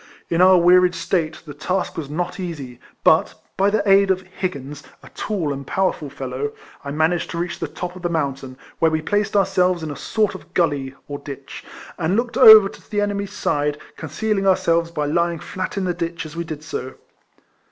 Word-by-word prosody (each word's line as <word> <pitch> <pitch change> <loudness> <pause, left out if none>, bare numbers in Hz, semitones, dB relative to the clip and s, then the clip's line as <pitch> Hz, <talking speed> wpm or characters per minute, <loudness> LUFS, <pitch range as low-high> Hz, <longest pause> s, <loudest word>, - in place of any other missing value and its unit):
In 170 +1 +2
our 185 0 +7
wearied 180 +1 +5
state, 160 -4 -2
the 145 - -8
task 180 +6 -2
was 150 -4 -5
not 175 +5 -3
easy, 145 -9 -6 0.2
but, - - +4 0.2
by 195 +1 +3
the 205 0 0
aid 195 0 +5
of 190 -1 +2
Higgins, 150 -7 -5 0.2
a - - -13
tall 175 -9 -2
and 140 -1 -8
power 190 -1 +1
ful 150 -4 -8
fellow, 135 +2 -4 0.3
1 140 +1 -6
managed 165 +2 +1
to - - -5
reach 170 +1 -3
the - - -2
top 180 0 -6
of 185 - -10
the 175 - -1
mountain, 135 -5 -3 0.2
where 165 - +4
we 160 0 0
placed 205 +5 0
ourselves 185 -3 +2
in 155 - -4
a - - -6
sort 215 +6 0
of - - -12
gully, 145 -6 0
or 145 -1 -5
ditch, 140 -1 -9 0.4
and 170 +3 +1
looked 235 +1 -1
over 220 -2 +10
to - - -14
the 205 - -1
enemy's 200 -1 -1
side, 145 0 -1 0.2
concealing 195 +5 -2
ourselves 170 -3 +2
by 150 -3 -2
lying 170 +3 +1
flat 185 +5 -5
in 195 - 0
the 180 -1 0
ditch, 170 -1 -4
as 155 +1 -9
we 170 - -2
did 155 -3 -7
so. 140 -4 -5
170 Hz, 205 wpm, -21 LUFS, 150-190 Hz, 0.4 s, over